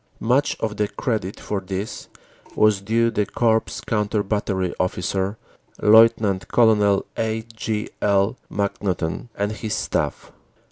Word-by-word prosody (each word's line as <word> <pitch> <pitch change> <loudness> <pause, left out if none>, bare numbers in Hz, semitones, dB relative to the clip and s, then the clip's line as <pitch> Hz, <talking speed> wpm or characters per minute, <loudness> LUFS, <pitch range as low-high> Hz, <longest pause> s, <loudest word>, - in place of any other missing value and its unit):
Much 125 +6 +2
of 110 -2 -3
the 105 - +1
credit 105 -4 -3
for 100 -2 -3
this 95 +3 -5 0.5
was 105 -2 +3
due 115 +3 +1
the 105 - +1
Corps 115 -2 +2 0.2
Counter 105 -3 0
Battery 95 -3 -1
Officer, 95 +3 -1 0.4
Lt. 105 -4 +5
Col. 105 -4 +4
A. 110 0 -1
G. 110 -1 -2
L. 100 +3 +2 0.2
McNaughton, 100 -1 -2
and 100 +1 -1
his 110 0 -3
staff. - - -2
105 Hz, 125 wpm, -22 LUFS, 100-110 Hz, 0.5 s, Lt